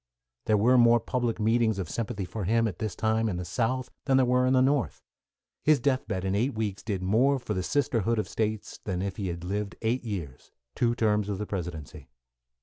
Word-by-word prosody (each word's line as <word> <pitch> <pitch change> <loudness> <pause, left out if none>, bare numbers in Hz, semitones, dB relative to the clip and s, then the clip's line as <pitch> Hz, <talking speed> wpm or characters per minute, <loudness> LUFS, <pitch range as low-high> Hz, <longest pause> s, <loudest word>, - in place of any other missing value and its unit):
There 110 - +3
were 125 +5 +5
more 120 0 +6
public 120 -1 -2
meetings 110 -1 +2
of 95 -4 -3
sympathy 105 +1 -3
for 105 +1 -5
him, 115 +3 +2
at 95 -5 -6
this 110 -4 -3
time, 110 0 +1
in 90 - -2
the 90 - -4
South 125 +7 -1
than 135 -2 +3
there 130 - +4
were 125 +1 +3
in 130 - +3
the 130 - +5
North. 135 -1 +1 0.6
His 155 -1 +4
death 130 +1 0
bed 95 -3 -3
in 95 - 0
eight 120 +6 0
weeks 105 -3 -2
did 100 -4 -3
more 125 +9 +3
for 120 -4 -4
the 95 - -1
sisterhood 115 -1 0
of 110 - -1
States 110 -1 -3
than 95 -2 -2
if 100 -1 -4
he 100 - -3
had 85 -1 -5
lived 100 +1 -3
eight 120 +3 0
years 90 - -6 0.2
two 120 -1 +1
terms 105 -3 +1
of 100 - -2
the 105 - -3
Presidency. 80 -8 -6
110 Hz, 220 wpm, -28 LUFS, 95-120 Hz, 0.6 s, more